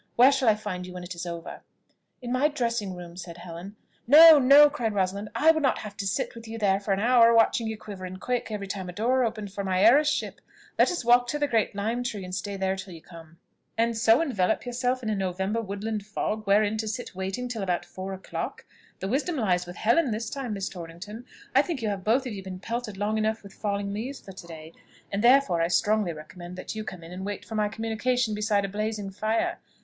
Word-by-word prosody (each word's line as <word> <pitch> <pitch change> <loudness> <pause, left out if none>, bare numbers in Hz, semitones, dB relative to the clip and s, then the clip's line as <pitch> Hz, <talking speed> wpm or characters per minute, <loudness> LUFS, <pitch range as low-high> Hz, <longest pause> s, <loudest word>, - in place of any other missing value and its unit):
Where 255 +3 +7
shall 270 -4 +2
I 215 - +4
find 180 -4 -5
you 180 - -9
when 180 0 -7
it 175 +1 -6
is 175 +1 -6
over?" 170 -1 -7 0.6
"In 240 - -4
my 255 +4 +3
dressing 235 -9 -2
room," 175 -1 -10
said 175 -1 -8
Helen. 175 +3 -9 0.3
"No, 310 +3 +10
no," 280 +3 +8
cried 240 -7 -2
Rosalind; 200 +2 -1
"I 310 +8 +6
would 315 -1 -1
not 270 -3 +2
have 210 -1 -8
to 195 0 -3
sit 265 +7 -1
with 230 0 -11
you 225 +1 -6
there 195 -3 +2
for 200 0 -4
an 195 - +2
hour, 235 +1 +5
watching 225 0 +3
you 220 0 -4
quiver 205 -3 -9
and 185 +1 -8
quake 245 +1 -2
every 210 -2 -4
time 195 -2 -5
a - - -7
door 250 +6 +1
opened, 215 -4 -3
for 200 - -4
my 190 0 +1
heiresship. 290 +7 +3 0.4
Let - - +6
us 350 -9 -3
walk 245 +1 +5
to 295 - -1
the 295 - +1
great 225 -6 0
lime 225 +4 -1
tree, 215 -5 -4
and 180 - -8
stay 200 +1 -4
there 190 0 0
till 190 -2 -8
you 165 - -12
come." 165 -1 -14 0.4
"And 230 0 +1
so 225 +4 +4
envelop 240 - 0
yourselves 250 +1 -1
in 220 - -2
a - - 0
November 190 +3 -1
woodland 210 +1 -4
fog, 215 +1 -3
wherein 205 +2 +3
to 220 - -2
sit 245 +2 -5
waiting 190 +6 -4
till 235 -3 -4
about 180 -2 -1
four 190 +1 -7
o'clock! 190 0 -6 0.4
The 190 - -2
wisdom 290 - -1
lies 180 -8 0
with 175 - -8
Helen 245 - +2
this 220 0 -3
time, 265 -5 -4
Miss 195 -1 -3
Torrington; 185 +6 -9 0.3
I 265 - +6
think 295 -6 -4
you 215 - 0
have 195 -2 -4
both 240 +6 +2
of 245 - -4
you 195 - -6
been 185 -1 -7
pelted 230 -1 -4
long 210 +2 0
enough 220 0 -1
with 200 - -12
falling 200 -1 -3
leaves 250 +7 -5
for 195 - -12
to 185 -2 -11
day, 160 -1 -10 0.4
and 200 +2 -1
therefore 240 -9 +5
I 165 - +2
strongly 205 +1 +1
recommend 175 +3 -10
that 185 - -6
you 215 0 -5
come 185 -5 -8
in 165 - -11
and 185 +1 -6
wait 205 +1 -5
for - - -9
my 210 -1 +1
communication 225 +2 -1
beside 210 -1 +1
a - - -2
blazing 210 0 -3
fire. 215 +3 -1
210 Hz, 240 wpm, -26 LUFS, 190-235 Hz, 0.6 s, No